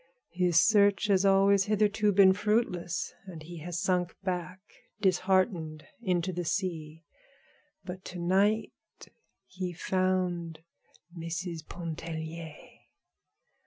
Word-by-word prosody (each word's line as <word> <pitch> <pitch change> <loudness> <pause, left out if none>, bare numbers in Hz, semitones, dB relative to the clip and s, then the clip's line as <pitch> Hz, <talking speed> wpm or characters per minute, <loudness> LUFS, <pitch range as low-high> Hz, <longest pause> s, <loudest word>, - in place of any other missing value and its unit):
His 175 -2 +3
search 205 0 +4
has 195 -1 +3
always 195 0 +4
hitherto 210 0 +2
been 190 -1 +6
fruitless, 195 -5 -1
and 165 -4 -9
he 170 +1 -9
has 170 +2 -4
sunk 180 -2 0
back, 180 0 -3 0.4
disheartened, 185 -5 +1 0.2
into 185 -3 0
the 175 +1 -3
sea. 165 -3 -3 0.8
But 185 0 -8
to 180 - -7
night 195 +5 +2 0.7
he 185 -1 -5
found 180 -2 -1 0.5
Mrs. 170 0 -5
Pontellier. 160 -1 -6
180 Hz, 100 wpm, -29 LUFS, 170-195 Hz, 0.8 s, been